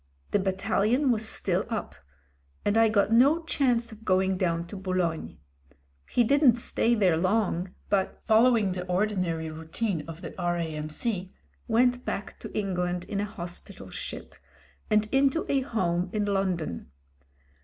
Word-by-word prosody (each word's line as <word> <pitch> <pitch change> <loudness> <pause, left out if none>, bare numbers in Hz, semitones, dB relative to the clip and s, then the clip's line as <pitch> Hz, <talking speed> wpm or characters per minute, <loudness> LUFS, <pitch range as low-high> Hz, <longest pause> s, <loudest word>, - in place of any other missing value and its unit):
The 205 - +3
battalion 205 +7 +1
was 220 -1 0
still - - -1
up, - - -3 0.7
and 205 - +2
I 225 0 +5
got 210 0 +2
no 280 +8 +5
chance 245 -7 +1
of 220 0 -12
going 190 -1 +2
down 170 -2 0
to 190 - -9
Boulogne. 185 -4 -2 0.7
He 240 - +3
didn't 275 0 +5
stay 235 0 +1
there 190 -6 +3
long, 185 0 0
but, 195 -2 0
fol 220 +2 +5
lowing 225 -6 +3
the 180 0 -3
ordinary 180 -4 0
routine 160 +3 -3
of 165 +1 -9
the - - -7
R.A.M.C, 175 +3 -2 0.4
went 245 +2 +3
back 200 - -5
to - - -8
England 180 -3 -1
in 200 +2 -4
a - - -1
hospital 175 -4 -8
ship, - - -6 0.6
and 215 0 +3
into 275 +4 +2
a 275 - +2
home 180 -8 -1
in 210 -1 0
London. 185 - -1
200 Hz, 145 wpm, -27 LUFS, 180-230 Hz, 0.7 s, I